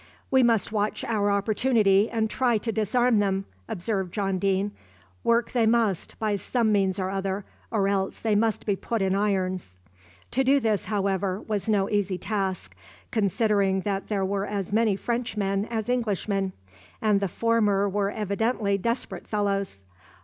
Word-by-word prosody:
"We 265 0 +5
must 230 -5 +2
watch 210 -1 -1
our 210 -3 +1
opportunity, 205 0 +3
and 225 -1 0
try 240 +1 +1
to 225 +2 -2
disarm 225 +2 +2
them," 195 -1 0 0.2
observed 190 -1 -2
John 195 -2 -1
Deane. 195 +1 +1 0.5
"Work 235 0 +2
they 235 -3 +2
must, 220 -6 +1
by 215 -2 0
some 220 +3 0
means 195 -3 +2
or 190 -1 -2
other, 195 0 -2 0.2
or 200 -3 +1
else 195 -1 -1
they 220 -2 0
must 220 0 +1
be 205 - +1
put 225 +1 -2
in 190 0 +1
irons." 185 - -1 0.5
To 265 - +2
do 275 +2 +4
this, 220 -5 0
however, 195 -2 0
was 210 0 -3
no 200 -2 +2
easy 200 -3 0
task, 190 - -3 0.4
considering 200 -2 +2
that 195 0 -2
there 200 -3 0
were 200 +1 -1
as 200 -2 -3
many 220 -2 +3
Frenchmen 210 -3 -1
as 225 -2 -3
Englishmen, 205 -5 -1 0.5
and 210 -2 +3
the 200 - 0
former 210 0 +2
were 200 0 0
evidently 205 0 0
desperate 235 +5 -3
fellows. 200 - -1
205 Hz, 155 wpm, -26 LUFS, 195-225 Hz, 0.5 s, We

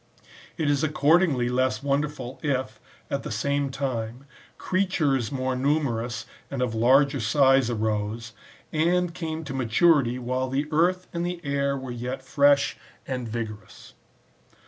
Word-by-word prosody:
It 160 -4 0
is 145 0 +2
accordingly 155 -3 +3
less 125 -1 0
wonderful, 140 -2 -2
if, 135 -3 -2 0.3
at 140 - -1
that 140 +6 -1
time, 130 -2 -4 0.3
creatures 155 - 0
more 130 -1 -1
numerous 125 -5 -1 0.2
and 135 -2 -2
of 120 -3 -1
larger 135 +5 +4
size 135 +1 +4
arose, 110 0 -2 0.4
and 170 +2 +2
came 160 -2 -4
to 145 -3 -6
maturity 130 +1 +3
while 130 +1 -2
the 135 +3 0
earth 180 +4 +2
and 170 0 -2
the 175 0 -3
air 140 0 0
were 130 -2 -6
yet 125 +2 -5
fresh 140 +1 +3 0.3
and 125 -3 -4
vigorous. 110 -3 -7
135 Hz, 130 wpm, -25 LUFS, 120-150 Hz, 0.4 s, larger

